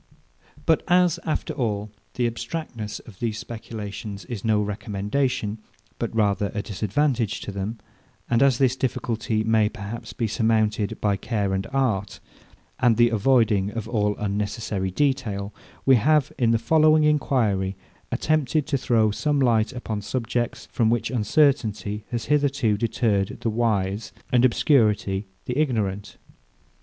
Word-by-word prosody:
But 160 - +3
as, 180 -1 +3
after 155 0 -2
all, 105 -6 -2 0.2
the 125 - +1
abstractedness 115 -2 -4
of 100 -5 -15
these 115 -3 -2
speculations 105 -3 -7
is 120 -6 -6
no 110 -2 +2
recommendation, 105 +2 -2 0.4
but - - -3
rather 100 -2 +2
a 105 - -2
disadvantage 115 +3 0
to - - -5
them, 100 +3 -4 0.5
and 120 -1 +2
as 135 -3 +4
this 130 -1 +3
difficulty 115 -4 -1
may 110 -1 +3
perhaps 115 +1 -7
be 115 - -2
surmounted 110 0 +1
by 100 -2 +1
care 100 -2 -1
and 95 0 -2
art, 110 -8 0 0.6
and 120 -3 +4
the 120 0 +5
avoiding 110 -3 +3
of 110 0 -5
all 105 -3 0
unnecessary 105 -1 -2
detail, 105 -4 -1 0.3
we 135 -2 +6
have, 150 +5 +3
in 120 -3 +2
the 115 - +4
following 155 +4 +4
enquiry, 115 -10 +1 0.4
attempted 155 -1 +1
to 140 -4 -1
throw 110 -4 +2
some 145 +7 0
light 115 -4 +3
upon 115 -5 -4
subjects, 120 +2 -2
from 115 -2 +2
which 120 +2 0
uncertainty 110 -4 +1
has 120 -1 -3
hitherto 140 -7 +2
deterred 105 -3 0
the 115 - 0
wise, 105 -2 -1 0.2
and 125 -1 +4
obscurity 110 -6 +2 0.2
the 125 +3 -2
ignorant. 105 -9 -1
115 Hz, 140 wpm, -24 LUFS, 105-130 Hz, 0.6 s, we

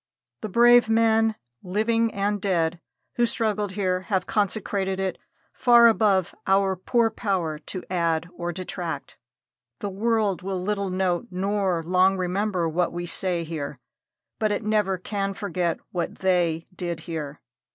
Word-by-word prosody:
The 215 - -4
brave 240 +2 +6
men, 225 0 +3 0.3
living 225 +4 +1
and 205 0 -1
dead, 175 -4 0 0.4
who 240 0 +3
struggled 210 -4 -1
here 185 -2 0
have 190 -3 +1
consecrated 195 -2 -1
it 190 -1 -2 0.3
far 240 -1 +6
above 205 -5 +3
our 195 0 +3
poor 225 +5 +1
power 175 -8 -2
to 180 +4 -7
add 170 -2 0
or 175 0 -3
detract. 185 +1 -5 0.6
The 205 -2 -4
world 210 -2 0
will 190 0 -3
little 200 +1 -1
note 185 +3 0
nor 190 -2 0
long 185 +2 +3
remember 185 -1 0
what 170 +2 0
we 175 0 -4
say 175 0 -1
here, 155 -3 -5 0.6
but 215 -2 +1
it 205 - -1
never 210 -3 +1
can 195 +1 -3
forget 180 -5 -2
what 175 -2 -3
they 175 -4 +1
did 175 -2 -4
here. 155 -4 -6
190 Hz, 140 wpm, -25 LUFS, 175-210 Hz, 0.6 s, brave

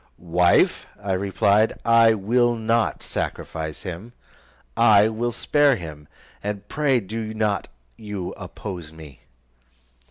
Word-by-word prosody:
"Wife," 90 0 +3
I 100 -1 -4
replied, 100 +3 +2
"I 115 -1 +5
will 120 +4 +2
not 115 0 0
sacrifice 80 -1 -5
him, 95 +6 -7 0.6
I 110 -3 +6
will 115 +2 -2
spare 145 +3 +2
him, 75 -6 -9 0.4
and 105 0 -4
pray 140 -2 +1
do 110 +1 -5
not 105 -2 -1 0.3
you 100 -4 -5
oppose 90 -3 -8
me." 80 -4 -13
105 Hz, 115 wpm, -23 LUFS, 90-115 Hz, 0.6 s, I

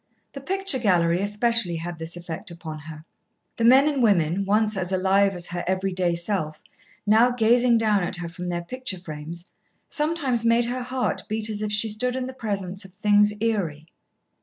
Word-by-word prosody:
The 275 - -8
picture 385 -2 +1
gallery 175 -5 +2
especially 210 -2 +1
had 170 0 -6
this 165 +1 -4
effect 175 +4 -7
upon 165 -2 -8
her. 155 +1 -11 0.5
The 230 - -1
men 265 +4 +7
and 285 -3 0
women, 195 -4 +2
once 215 +2 +2
as 185 -1 -2
alive 195 +1 +2
as 175 -1 -4
her 175 0 -4
everyday 185 -2 0
self, 170 -4 -3 0.4
now 220 +4 +5
gazing 240 0 +3
down 215 -3 +2
at 175 - -2
her 175 -1 -5
from 175 +1 -7
their 175 -1 -3
picture 255 +1 -4
frames 170 0 -8 0.4
sometimes 295 -6 0
made 230 +1 +3
her 250 +2 -3
heart 255 +1 -2
beat 220 0 0
as 210 0 -4
if 210 -1 -2
she 210 +2 +2
stood 245 +4 -2
in 260 -1 -2
the 260 - -7
presence 200 -6 -4
of 190 -2 -14
things 210 +1 +3
eerie. 180 -10 -1
200 Hz, 185 wpm, -24 LUFS, 175-235 Hz, 0.5 s, men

